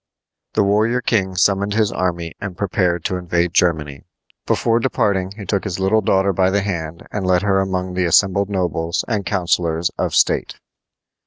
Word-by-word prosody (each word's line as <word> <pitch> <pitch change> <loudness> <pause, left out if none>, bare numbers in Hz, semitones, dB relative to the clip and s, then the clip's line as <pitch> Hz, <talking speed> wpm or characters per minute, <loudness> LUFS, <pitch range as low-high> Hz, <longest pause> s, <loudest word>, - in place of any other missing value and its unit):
The - - +3
warrior 110 +5 +2
king 95 -6 0
summoned 100 +2 +1
his 110 -2 +2
army 85 -2 -2
and 95 -3 -6
prepared 90 -4 0
to 90 - -1
invade 85 -1 -1
Germany. 75 -5 +1 0.5
Before 115 0 +2
departing 100 -7 0
he 100 - -7
took 100 +1 -1
his 95 -3 -4
little 95 +3 +2
daughter 95 0 +2
by 95 +1 +2
the 100 +1 +1
hand 85 -5 -5
and 100 - -3
led 90 0 +2
her 95 -2 +2
among 95 -1 -2
the 90 0 0
assembled 95 +3 +3
nobles 85 -4 -1
and 105 -5 -2
councilors 85 -3 0
of - - -1
state. - - +2
95 Hz, 170 wpm, -19 LUFS, 85-100 Hz, 0.5 s, The